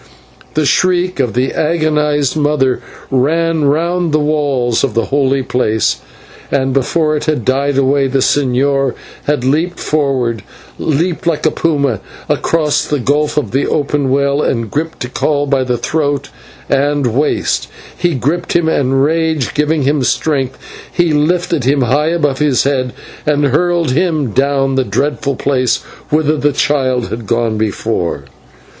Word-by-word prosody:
The 155 -1 +2
shriek 180 +2 +1
of 125 -5 0
the 130 +2 0
agonized 150 -3 +1
mother 145 -4 +1 0.3
ran 160 +4 +1
round 170 +4 +1
the 155 - +3
walls 145 -6 0
of 130 -6 -1
the 115 - +1
holy 135 -1 +2
place, 110 -4 0 0.5
and 135 -1 0
before 155 +4 +1
it 150 - -3
had 150 -7 -1
died 140 +1 +1
away 135 0 +2
the 135 +1 0
señor 135 0 +1 0.3
had 145 -4 0
leaped 160 +7 0
forward 130 -7 0 0.4
leaped 165 +3 -1
like 165 -2 0
a 155 - +4
puma 140 -9 0 0.3
across 155 -3 +1
the 150 - -1
gulf 145 +4 0
of 135 -9 0
the 135 +4 0
open 145 -2 0
well 140 +2 +1
and 115 -6 -1
gripped 160 +2 -3
Tikal 145 +4 0
by 135 -1 +1
the 125 -1 -1
throat 145 0 -1 0.4
and 145 0 +1
waist. 145 +3 0 0.3
He 175 -3 0
gripped 155 +8 -1
him, 170 -2 +3
and, 135 -3 +2
rage 160 -3 0
giving 150 0 +1
him 145 +1 +1
strength, 135 -1 0 0.3
he 175 -3 +1
lifted 165 0 +1
him 140 +1 +2
high 140 +5 +2
above 150 -5 0
his 145 -4 +2
head 130 -3 0 0.3
and 145 -1 +2
hurled 170 +2 +1
him 155 -4 0
down 135 +2 +1
the 130 0 +2
dreadful 140 +5 -1
place 130 -1 +1 0.3
whither 155 0 +2
the 145 0 +1
child 130 -3 0
had 110 -1 -6
gone 115 -1 0
before. 105 -8 -2
140 Hz, 150 wpm, -15 LUFS, 130-155 Hz, 0.5 s, a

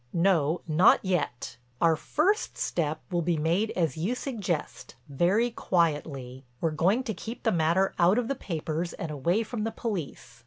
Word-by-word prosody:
"No, 170 -3 +2
not 160 +3 +5
yet. 160 -10 -2 0.2
Our 165 -1 +4
first 365 - 0
step 155 -2 -1
will 175 -1 +1
be 170 0 0
made 170 +8 +1
as 165 -6 0
you 190 +10 -1
suggest, 205 - -4
very 185 - +2
quietly. 145 - -1 0.2
We're 165 - 0
going 185 +11 +2
to 230 -4 -3
keep 225 +6 -8
the 225 - +2
matter 170 +3 +2
out 180 +5 +5
of 245 -2 0
the 275 - 0
papers 165 - -3
and 165 - -5
away 170 +10 +1
from 225 -1 -4
the 225 - 0
police. 195 - -5
175 Hz, 165 wpm, -28 LUFS, 155-215 Hz, 0.2 s, not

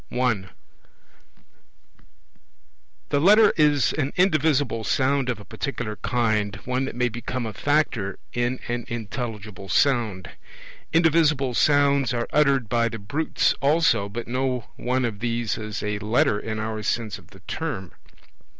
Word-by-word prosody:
(1) 115 -7 0 2.6
The 145 - +2
Letter 210 +4 +6
is 145 -6 +3
an 145 -2 -1
indivisible 155 - +2
sound 130 +5 +1
of 120 -4 -2
a 105 - -12
particular 110 -2 -4
kind, 110 -5 0
one 130 +1 0
that 135 - -6
may 125 0 +1
become 120 +1 -4
a 110 - -5
factor 135 -10 0 0.2
in 120 +1 -1
an 120 -1 -3
intelligible 105 -4 -6
sound. 115 -7 +1 0.6
Indivisible 155 -5 +3
sounds 140 -2 +3
are 120 0 -2
uttered 140 -5 +3
by 115 +1 +1
the 115 - -6
brutes 125 +10 0
also, 140 -9 +3
but 115 +3 -6
no 125 -1 -2
one 125 +1 0
of 110 -4 -4
these 115 -1 -1
is 105 -1 -5
a 105 -1 -2
Letter 105 -1 +2
in 110 0 -4
our 110 0 -3
sense 110 -2 -2
of - - -19
the 95 -1 -17
term. 105 - -5
120 Hz, 140 wpm, -24 LUFS, 110-140 Hz, 2.6 s, Letter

